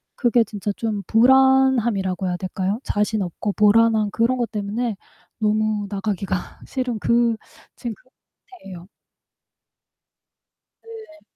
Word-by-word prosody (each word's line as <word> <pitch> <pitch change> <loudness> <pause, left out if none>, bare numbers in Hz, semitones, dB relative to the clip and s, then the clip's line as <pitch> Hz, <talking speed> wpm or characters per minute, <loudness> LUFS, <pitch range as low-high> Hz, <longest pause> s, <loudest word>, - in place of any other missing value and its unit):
그게 240 -2 +3
진짜 205 0 -4
좀 215 -3 -3
불안함이라고 240 -6 +3
해야 180 - -1
될까요? 190 +3 -3
자신 210 0 -1
없고 195 +3 -4
불안한 215 0 +3
그런 235 +4 +1
것 240 -2 -2
때문에 215 +2 -2 0.4
너무 215 -1 0
나가기가 195 -2 -3
싫은 250 -4 -3
그 235 0 +2 0.4
지금 235 -2 -5
그 255 - -29 0.5
상태예요. 180 -2 -11 2.0
네. 440 -9 -12
220 Hz, 245 characters per minute, -22 LUFS, 200-240 Hz, 2.0 s, 그게